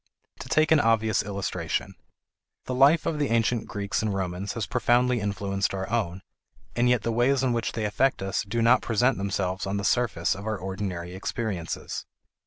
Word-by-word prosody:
To - - -8
take 155 +1 +3
an 160 - +6
obvious 110 -3 +2
illustration: 100 -2 -3 0.7
The 130 - -3
life 140 +5 +5
of 155 - -1
the 145 - 0
ancient 115 0 +1
Greeks 100 -1 -2
and 110 -1 -1
Romans 95 0 -3
has 115 -3 -2
profoundly 125 -1 +2
influenced 100 -1 -1
our 95 0 -3
own, 95 -6 -1 0.5
and 120 +1 +3
yet 125 -3 +2
the 115 - 0
ways 125 +4 +2
in 125 -2 +2
which 115 -1 -1
they 110 -1 -2
affect 105 +2 +1
us 95 +1 -1
do 115 +3 -1
not 120 +2 +5
present 120 +2 +1
themselves 95 -1 -2
on 100 +1 -1
the 100 - -3
surface 110 -6 +1
of 100 +2 -7
our 110 -1 -1
ordinary 95 -2 -5
experiences. 95 -3 -4
110 Hz, 185 wpm, -26 LUFS, 95-120 Hz, 0.7 s, an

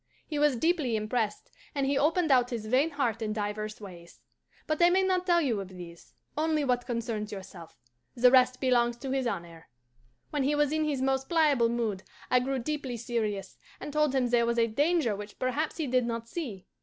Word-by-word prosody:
"He 300 -3 -3
was 295 -2 +3
deeply 305 -3 +1
impressed, 215 0 -2 0.2
and 275 -1 +1
he 275 +1 +1
opened 320 +3 +2
out 250 -2 +4
his 230 -3 -4
vain 260 +8 +2
heart 240 -7 -1
in 215 -1 -2
divers 215 0 -4
ways. 175 -5 -12 0.5
But 310 +1 -1
I 345 - +7
may 375 +2 +3
not 370 -1 0
tell 345 -1 +4
you 235 -9 0
of 195 - -7
these 175 -2 -12 0.2
only 310 -1 +1
what 245 -2 0
concerns 230 -3 -3
yourself; 185 -4 -10 0.4
the 245 +1 +5
rest 255 -1 +4
belongs 240 -2 +2
to 265 +2 -5
his 265 -2 0
honour. 170 -6 -6 0.6
When 295 - -1
he 285 +3 +1
was 295 -1 +2
in 310 0 +1
his 280 -4 -1
most 265 0 0
pliable 295 -8 +3
mood, 225 -5 -1 0.3
I 250 - +5
grew 265 +2 -1
deeply 260 -1 -3
serious, 215 -4 -3 0.2
and 295 - -7
told 300 -2 +2
him 250 -2 +1
there 235 -1 +3
was 235 0 0
a 230 - +4
danger 285 0 +1
which 205 +1 -9
perhaps 280 +5 -1
he 320 - -1
did 250 -2 +1
not 230 -1 -4
see. 230 - -6
250 Hz, 205 wpm, -29 LUFS, 220-290 Hz, 0.6 s, I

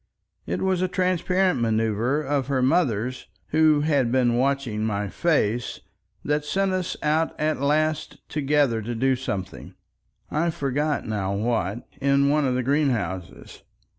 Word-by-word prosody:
It - - -2
was 190 -1 +1
a 185 - +2
transparent 185 -3 +1
manoeuver 115 +5 +1
of 140 -2 -1
her 135 -2 +1
mother's 130 - 0 0.2
who 155 -1 +4
had 140 -6 +1
been 125 -2 +2
watching 130 -4 0
my 105 -2 -1
face, 120 - 0 0.5
that 150 0 0
sent 190 +5 0
us 185 -1 -2
out 155 +2 0
at 155 -2 0
last 155 +2 0
together 145 -5 +1
to 120 +3 -4
do 130 +3 +2
something—I 130 - -5
forget 145 0 -1
now 100 -3 -2
what—in 120 +6 0
one 150 0 +2
of 125 - 0
the 130 - 0
greenhouses. 120 - -2
140 Hz, 135 wpm, -24 LUFS, 115-155 Hz, 0.5 s, who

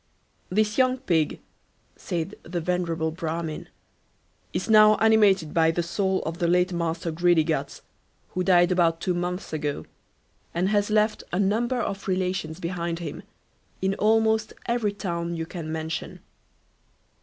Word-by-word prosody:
"This 215 +4 +1
young 255 0 +3
pig, 170 - 0 0.5
said 170 +3 -4
the 175 +1 -4
venerable 165 -2 -1
Bramin, 160 -1 -4 0.8
is - - -3
now 215 -1 +7
animated 205 -7 +3
by 160 -1 +4
the 170 +1 0
soul 190 +3 -1
of 165 +1 -5
the 170 - +1
late 180 +1 +2
master 165 0 -2
Greedyguts, 165 -1 +1 0.5
who 185 - -2
died 180 -1 +4
about 170 -2 +2
two 180 +1 -1
months 175 0 -3
ago, 150 -2 -3 0.7
and 180 +3 +1
has 205 0 +1
left 215 0 +2
a 180 - -1
number 230 +6 +1
of 200 -4 -4
relations 185 -3 -1
behind 170 -1 -3
him 170 - -6 0.6
in 190 +1 0
almost 220 +1 +2
every 235 -3 0
town 170 -4 -3
you 165 0 -3
can 165 -2 -6
mention. 160 0 -4
180 Hz, 140 wpm, -25 LUFS, 165-205 Hz, 0.8 s, now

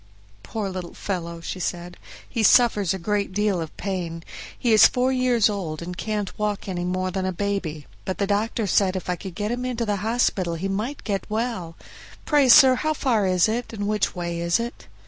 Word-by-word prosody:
"Poor 210 - -4
little 185 -2 -6
fellow!" 170 -3 -4
she 185 - -5
said, 175 0 -4 0.3
"he 230 - -2
suffers 215 -4 +5
a 200 +2 -1
deal 200 -2 0
of 160 - -7
pain; 175 -4 -4 0.3
he 235 -2 +2
is 215 - +9
four 255 +1 +1
years 250 -4 +3
old 180 -7 -3
and 180 +1 -6
can't 210 0 -3
walk 210 -1 -2
any 180 -2 -3
more 185 +1 -1
than 190 0 -2
a 185 - 0
baby; 180 -6 -3 0.2
but 190 - -3
the 200 - +1
doctor 210 +2 0
said 190 0 +2
if 180 -1 -3
I - - 0
could 185 0 -9
get 210 +1 -2
him 245 +1 -2
into 245 -2 -2
the 205 -2 0
hospital 200 -5 0
he 180 +4 -3
might 215 +9 -3
get 200 -2 -3
well; 215 -7 -3 0.5
pray, 290 -4 +4
sir, 260 +1 +9
how 310 +4 -1
far 225 -8 +1
is 185 0 +3
it; 230 +2 -3
and 205 -2 -3
which 210 -2 0
way 170 -1 -3
is 170 +3 +1
it?" 235 +1 -6
200 Hz, 205 wpm, -24 LUFS, 180-225 Hz, 0.5 s, is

